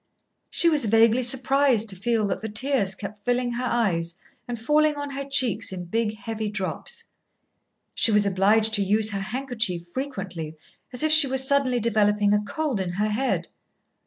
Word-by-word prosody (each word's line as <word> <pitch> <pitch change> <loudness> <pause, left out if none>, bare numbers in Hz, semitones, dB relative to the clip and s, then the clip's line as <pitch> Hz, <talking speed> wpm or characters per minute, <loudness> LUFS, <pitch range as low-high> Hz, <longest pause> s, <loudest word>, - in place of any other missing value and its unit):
She 340 - +1
was 300 -6 +3
vaguely 225 +3 +4
surprised 255 -1 +3
to 190 - +2
feel 220 +3 0
that 195 - -3
the 220 - -5
tears 220 -3 0
kept 205 +1 -9
filling 245 +1 0
her 245 +1 -3
eyes 175 -9 -1 0.3
and 240 -2 -5
falling 300 +5 +2
on 285 -1 -5
her 275 0 -4
cheeks 250 -7 +1
in 180 -2 -6
big 220 +4 -2
heavy 220 -1 -5
drops. 210 - -5 0.9
She 225 - +2
was 210 -1 +3
obliged 205 +3 +2
to 205 -2 +2
use 215 +2 +1
her 200 - -3
handkerchief 220 -5 -2
frequently, 185 - -6 0.4
as 250 +3 0
if 310 - +2
she 310 -2 +6
was 265 0 0
suddenly 270 -3 +2
developing 210 -2 +2
a 210 - +2
cold 260 +3 -3
in 180 -2 -3
her 210 +3 -1
head. 245 +6 -1
225 Hz, 175 wpm, -24 LUFS, 205-260 Hz, 0.9 s, she